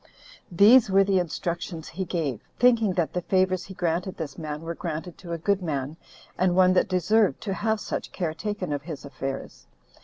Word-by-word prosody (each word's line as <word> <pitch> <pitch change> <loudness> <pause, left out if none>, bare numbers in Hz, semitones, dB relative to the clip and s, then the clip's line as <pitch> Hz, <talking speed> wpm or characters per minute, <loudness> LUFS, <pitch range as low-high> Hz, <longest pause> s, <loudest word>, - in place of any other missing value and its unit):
These 215 +6 +7
were 195 +1 +5
the 195 -1 +2
instructions 170 -1 -4
he 190 +3 -4
gave, 150 - -2 0.2
thinking 235 -5 +4
that 175 -3 -1
the 180 - -1
favors 185 0 +1
he 190 - -10
granted 175 +1 -1
this 155 -5 -5
man 150 -1 -6
were 165 +1 -4
granted 165 +1 -5
to 175 -2 -9
a 170 - -1
good 200 +4 0
man, 145 -3 -3 0.4
and 180 -1 +3
one 185 0 +5
that 185 - +2
deserved 200 +3 +2
to 205 -3 -2
have 220 +2 0
such - - -4
care 170 -4 -2
taken 195 -3 -3
of 145 - -2
his 150 -2 -8
affairs. 135 - -6
180 Hz, 190 wpm, -26 LUFS, 160-195 Hz, 0.4 s, These